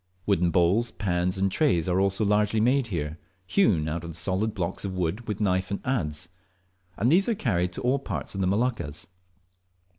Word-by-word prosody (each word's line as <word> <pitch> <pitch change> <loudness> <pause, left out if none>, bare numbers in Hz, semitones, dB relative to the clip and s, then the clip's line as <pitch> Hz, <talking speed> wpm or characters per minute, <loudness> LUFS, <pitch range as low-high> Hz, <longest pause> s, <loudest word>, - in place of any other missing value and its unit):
Wooden 90 -4 +2
bowls, 90 +8 +2
pans, 90 -3 -1
and 95 0 +1
trays 95 - +2
are 90 +1 +2
also 100 +2 +2
largely 105 +1 +2
made 125 +3 +2
here, 80 -5 -4 0.3
hewn 90 - +2
out 80 +2 -3
of 85 -1 -6
solid 95 +6 0
blocks 90 -4 -3
of 95 -2 -3
wood 95 +6 -2
with 105 -2 -3
knife 95 -2 +1
and 100 - -2
adze; 90 - -2 0.7
and 120 +6 +2
these 195 +7 +4
are 230 - +1
carried 90 - 0
to - - -6
all 130 +3 +1
parts 135 - -5
of 95 - -3
the 95 - +1
Moluccas. 105 - -1
95 Hz, 185 wpm, -26 LUFS, 85-110 Hz, 0.7 s, these